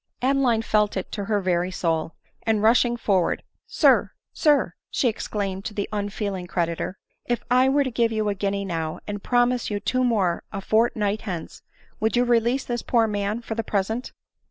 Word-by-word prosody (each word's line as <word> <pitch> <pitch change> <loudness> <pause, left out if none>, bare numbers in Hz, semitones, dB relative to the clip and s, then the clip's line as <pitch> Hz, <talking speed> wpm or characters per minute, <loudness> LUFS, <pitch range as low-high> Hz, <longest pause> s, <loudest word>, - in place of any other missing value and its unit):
Adeline 255 -4 +2
felt 210 -2 +1
it 190 - -4
to 205 -2 -4
her 210 0 +1
very 180 -1 0
soul; 165 -3 -1 0.3
and, 220 -2 +1
rushing 240 +1 +4
forward, 195 -6 +1 0.2
" - - -65
Sir, - - +4 0.2
sir," 290 - +3 0.2
she 255 - +1
exclaimed 200 -3 -2
to 210 - -5
the 200 - -1
unfeeling 200 -2 -3
creditor, 170 +2 -2 0.2
" - - -46
if 240 -1 -1
I 255 +1 +5
were 285 +1 +3
to 260 - -3
give 230 0 +1
you 215 -1 0
a 205 - +1
guinea 200 0 -2
now, 165 -3 -3
and 205 -1 -5
promise 245 +1 +2
you 205 -1 -2
two 255 +5 0
more 200 -8 +1
a 200 - -4
fortnight 215 0 +1
hence, 175 -5 -6 0.4
would 220 +2 +1
you 245 - +4
release 240 +2 +2
this 240 -1 -2
poor 230 -2 +2
man 210 +2 -2
for 225 - -4
the 225 0 -2
present 220 +5 -2
215 Hz, 190 wpm, -24 LUFS, 195-240 Hz, 0.4 s, I